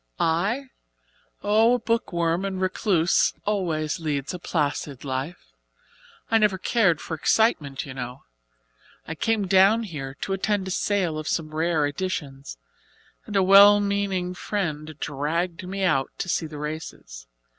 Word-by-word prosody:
"I? 205 +12 0 0.7
Oh, 220 +4 +4
a - - -2
book 230 -1 -1
worm 170 +1 0
and 195 -1 -3
recluse 185 -2 +2
always 170 -8 -1
leads 150 -3 -2
a 180 - -6
placid 145 -4 -2
life. 130 - -5 0.8
I 225 - +5
never 210 -3 +2
cared 185 -6 +2
for - - -7
excitement, 155 - +1
you 135 - -8
know. 125 0 -7 0.8
I 160 - -3
came 215 +5 0
down 195 +4 +4
here 140 -9 -6
to 195 - -2
attend 195 0 -1
a - - -3
sale 180 -5 0
of 155 - -6
some 155 -2 -2
rare 160 -1 +1
editions, 145 - -4 0.7
and 210 - -6
a 195 - +4
well 200 +2 +8
meaning 200 -3 -1
friend 155 -6 -4
dragged 165 +5 -2
me 195 +1 -3
out 135 -8 +2
to - - -3
see 170 -2 -1
the 150 -1 -9
races. 145 - -7
175 Hz, 145 wpm, -24 LUFS, 150-200 Hz, 0.8 s, well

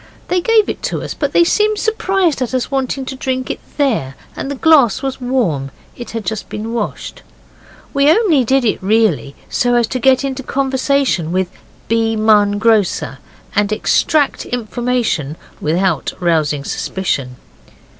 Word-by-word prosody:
They 360 0 +1
gave 445 +1 +3
it - - -3
us, - - -4
but - - -2
they 345 - +5
seemed 425 +4 +2
surprised 385 - 0
at 255 0 -1
us 255 - -2
wanting 270 0 -1
to 265 - -5
drink 260 0 -2
it - - -5 0.2
there, 220 - 0 0.2
and - - -5
the 285 - -3
glass 275 -5 +4
was 270 -1 -3
warm 210 - 0 0.3
it 240 - -8
had 225 -3 -5
just 215 +3 -4
been 220 +2 -5
washed. 225 -3 -4 0.7
We 280 +1 +4
only 330 - +4
did 265 +2 +2
it, 215 - 0
really, 195 -8 +1
so 245 0 +1
as 240 -1 +3
to 255 - -2
get 260 +2 +3
into 270 -1 -3
conversation 265 - 0
with 185 0 0 0.4
B. 225 0 +1
Munn, 210 -2 +3
grocer, 210 -10 +1 0.4
and 205 0 +1
extract 285 +6 +1
information 235 - -1 0.3
without 180 +5 0
rousing 155 -5 +1
suspicion. 140 -8 -3
240 Hz, 155 wpm, -17 LUFS, 205-270 Hz, 0.7 s, they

